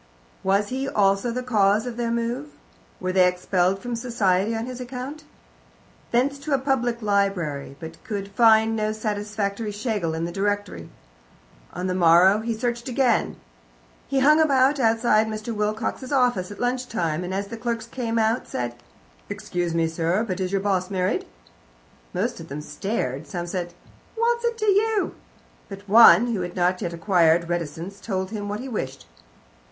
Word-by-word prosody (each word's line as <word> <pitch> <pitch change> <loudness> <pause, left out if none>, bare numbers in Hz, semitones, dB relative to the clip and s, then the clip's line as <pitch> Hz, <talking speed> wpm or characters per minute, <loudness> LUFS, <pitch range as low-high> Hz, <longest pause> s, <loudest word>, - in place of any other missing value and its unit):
Was 200 +2 +1
he 265 +2 -2
also 195 +3 +2
the 250 +2 -3
cause 215 -2 +2
of 245 -2 -5
their 235 -1 -2
move? 235 -8 -2 0.5
Were 185 - -2
they 185 -1 +5
expelled 180 +1 +1
from 240 +4 -5
society 225 -3 +1
on 225 +1 -3
his 250 0 -7
account? 255 +4 -7 0.8
Thence 275 +4 +1
to 285 0 0
a - - +2
public 245 -4 -1
library, 190 -10 0
but 160 -1 -10
could 205 -5 -4
find 220 +1 +5
no 215 0 -1
satisfactory 210 0 -3
Schlegel 205 -6 -2
in 165 +1 -2
the 170 - -4
directory. 200 - -2 0.8
On 180 - -5
the 185 - 0
morrow 180 +3 +5
he 225 +1 -2
searched 235 +1 -2
again. 250 -2 +1 0.7
He 270 -1 +1
hung 305 +3 +6
about 275 -1 +3
outside 225 -2 +3
Mr. 215 +1 -4
Wilcox's 220 +5 -2
office 245 -9 +2
at 205 - -10
lunch 250 +1 -1
time, 170 -7 -2
and, 180 - -5
as 200 +1 -3
the 230 - -5
clerks 230 -1 -3
came 235 -1 -3
out 225 +2 +1
said: 120 -1 -3 0.6
"Excuse 175 -2 -3
me, 165 -1 +2
sir, 165 +5 0
but 195 -4 -4
is 185 -1 -2
your 195 -1 0
boss 190 -2 0
married?" 185 -2 -1 0.8
Most - - -2
of - - -9
them 145 +2 -6
stared, 150 - -3
some 175 -3 -4
said, 175 -1 -4 0.4
"What's 470 +1 +1
that 470 -1 -1
to 430 - -2
you?" 420 +1 +2 0.6
but 200 0 -10
one, 225 +1 +7
who 200 - -1
had 175 0 -5
not 180 0 +1
yet 175 -4 -2
acquired 170 -1 +3
reticence, 175 +3 -4
told 190 -2 -3
him 205 -2 -4
what 210 +2 -3
he 265 - -6
wished. 135 - -5
210 Hz, 170 wpm, -24 LUFS, 185-240 Hz, 0.8 s, one